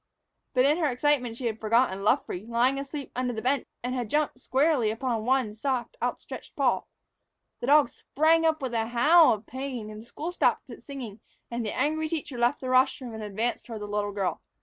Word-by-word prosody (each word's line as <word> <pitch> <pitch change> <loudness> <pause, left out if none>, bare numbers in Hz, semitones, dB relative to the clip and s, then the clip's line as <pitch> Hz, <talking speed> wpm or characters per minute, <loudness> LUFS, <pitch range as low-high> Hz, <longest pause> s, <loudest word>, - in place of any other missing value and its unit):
But 255 +1 +5
in 300 +4 +3
her 315 - +2
excitement 250 -3 +1
she 250 - -5
had 225 -1 -2
forgotten 220 -3 +2
Luffree, 200 -1 0
lying 245 +4 +2
asleep 280 0 -6
under 250 0 -1
the 220 - -4
bench, 270 +2 +1 0.2
and 250 +1 -2
had 245 -4 -3
jumped 300 -2 0
squarely 265 -3 +2
upon 225 0 -2
one 255 -4 +1
soft, 255 - -2
outstretched - - -5
paw. - - +1 0.7
The 240 - -4
dog 290 -2 +6
sprang 320 +2 +2
up 320 -2 +1
with 255 -2 -3
a 225 -1 0
howl 300 +8 +6
of 215 0 -2
pain, 250 -5 -6
the 215 - -9
school 305 +8 -6
stopped 355 - +1
its - - -12
singing, 245 -7 -7 0.3
and 235 0 -2
the 210 - -4
angry 310 +3 0
teacher 295 -6 -4
left 240 +4 +2
the 255 - -4
rostrum 255 -1 +2
and 220 - -6
advanced 215 +3 -2
toward 225 -3 -6
the - - -4
little 205 0 -2
girl. 195 -2 -2
250 Hz, 200 wpm, -27 LUFS, 225-280 Hz, 0.7 s, dog